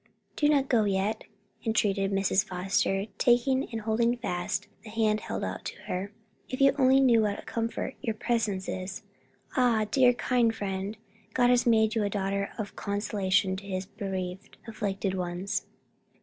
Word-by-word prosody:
'" 200 0 -43
"Do 295 - +3
not 280 -2 +3
go 230 -5 +3
yet!" 200 +2 0 0.4
entreated 200 -3 +1
Mrs. 195 0 +2
Foster, 195 0 0
taking 260 +2 +3
and 225 -1 -3
holding 230 +3 +1
fast 175 -6 -2 0.2
the 220 - -10
hand 215 -1 +1
held - - -4
out - - -4
to - - -5
her, 190 +3 -3 0.4
"if 255 - -4
you 275 0 +6
only 265 0 +6
knew 240 -4 +5
what 205 -1 0
a - - -9
comfort 230 +3 -3
your 225 -5 -2
presence 215 -5 -1
is 185 0 -5 0.5
Ah, 240 -5 +3
dear, 250 -1 +5
kind 240 -2 +1
friend, 195 +1 -3 0.4
God 245 -1 +4
has 245 -1 +3
made 220 -1 +4
you 225 -2 +1
a 205 - 0
daughter 200 0 -1
of 215 -3 -5
consolation 200 -2 0
to 195 - -9
his 185 -1 -3
bereaved, 190 -1 -5
afflicted 200 -3 -2
ones!" 180 +1 -3
210 Hz, 165 wpm, -28 LUFS, 195-235 Hz, 0.5 s, you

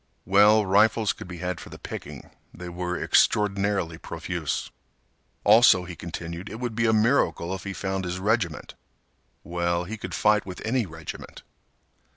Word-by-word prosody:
Well, 105 +3 +5
rifles 105 +2 +3
could - - -10
be 90 -1 -8
had 90 0 -3
for - - -10
the - - -10
picking. - - -9 0.2
They 90 0 -8
were 90 0 -3
extraordinarily 100 -5 +1
profuse. 85 -3 -4 0.7
Also, 105 -3 +6
he 90 0 -8
continued, 85 +2 -7
it 110 - -7
would 120 -2 -3
be 115 +1 +1
a - - +4
miracle 110 -5 +2
if 95 - -6
he 100 - -4
found 95 0 -3
his 90 +1 -3
regiment. 95 -4 -1 0.7
Well, 85 0 -1
he 110 +5 -6
could - - -6
fight 105 -1 +3
with 90 -1 -8
any 115 -1 0
regiment. 80 -1 -9
95 Hz, 160 wpm, -25 LUFS, 85-105 Hz, 0.7 s, Also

